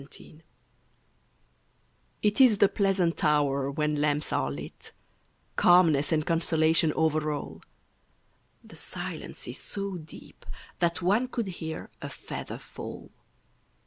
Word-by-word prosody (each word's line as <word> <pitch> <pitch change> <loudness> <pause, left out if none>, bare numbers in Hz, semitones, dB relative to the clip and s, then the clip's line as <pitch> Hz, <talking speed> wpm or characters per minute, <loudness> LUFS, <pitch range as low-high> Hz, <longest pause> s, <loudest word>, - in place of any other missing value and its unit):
XII 155 - -14 1.8
It 210 +4 +3
is 240 -6 +7
the 200 - +6
pleasant 190 -4 +1
hour 140 -2 +2
when 150 0 -1
lamps 150 0 +1
are 65 - +1
lit; 70 +1 -8 0.6
Calmness 165 -5 +5
and 155 -2 +1
consolation 160 -1 +3
over 155 -1 +1
all; 145 -1 -6 1.0
The - - -12
silences - - -5
so 200 -2 -3
deep 155 -2 -13 0.4
that 170 +1 0
one 210 +8 +2
could 235 -5 -3
hear 160 -3 -6
A - - -5
feather - - -7
fall. - - -9
160 Hz, 115 wpm, -28 LUFS, 150-185 Hz, 1.8 s, is